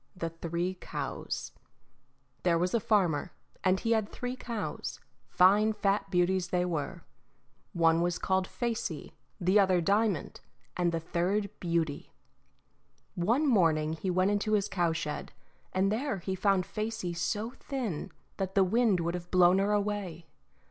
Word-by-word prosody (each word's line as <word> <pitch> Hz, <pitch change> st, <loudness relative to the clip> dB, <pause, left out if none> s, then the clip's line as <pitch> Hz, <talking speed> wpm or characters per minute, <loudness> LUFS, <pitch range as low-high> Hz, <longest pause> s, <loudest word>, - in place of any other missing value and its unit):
The 165 Hz, -2 st, -3 dB
Three 170 Hz, +2 st, -3 dB
Cows -, -, -4 dB, 0.9 s
There 170 Hz, -2 st, +3 dB
was 180 Hz, +2 st, 0 dB
a 235 Hz, -, +3 dB
farmer, 180 Hz, -7 st, +1 dB, 0.3 s
and 185 Hz, 0 st, +3 dB
he 230 Hz, -, -1 dB
had 220 Hz, -2 st, +2 dB
three 250 Hz, +1 st, -4 dB
cows, 235 Hz, -4 st, -5 dB, 0.3 s
fine 205 Hz, +4 st, +5 dB
fat 200 Hz, -1 st, 0 dB
beauties 180 Hz, 0 st, +2 dB
they 180 Hz, 0 st, 0 dB
were. 160 Hz, -5 st, -3 dB, 0.7 s
One 165 Hz, -1 st, +3 dB
was 175 Hz, 0 st, 0 dB
called 190 Hz, -1 st, 0 dB
Facey, 235 Hz, -2 st, -3 dB, 0.3 s
the 185 Hz, +3 st, +4 dB
other 190 Hz, -2 st, +4 dB
Diamond, 200 Hz, +1 st, 0 dB, 0.3 s
and 175 Hz, -1 st, +1 dB
the 165 Hz, -, -1 dB
third 185 Hz, +5 st, -1 dB
Beauty. 165 Hz, -4 st, -1 dB, 1.0 s
One 230 Hz, -, +1 dB
morning 165 Hz, -, +3 dB
he 165 Hz, +4 st, -3 dB
went 185 Hz, +2 st, +2 dB
into 205 Hz, +1 st, 0 dB
his 205 Hz, -2 st, +2 dB
cowshed, 165 Hz, -4 st, -2 dB, 0.4 s
and 190 Hz, +2 st, +1 dB
there 250 Hz, +1 st, -1 dB
he 190 Hz, +1 st, -4 dB
found 190 Hz, -1 st, +2 dB
Facey 215 Hz, -5 st, -3 dB
so 210 Hz, +6 st, -2 dB
thin 250 Hz, -, -4 dB, 0.3 s
that 190 Hz, -1 st, -3 dB
the 195 Hz, -, +6 dB
wind 210 Hz, -1 st, +2 dB
would 170 Hz, +1 st, -1 dB
have 175 Hz, 0 st, -6 dB
blown 180 Hz, +1 st, +5 dB
her 200 Hz, +1 st, +1 dB
away. 200 Hz, -5 st, -2 dB
185 Hz, 145 wpm, -30 LUFS, 175-210 Hz, 1.0 s, the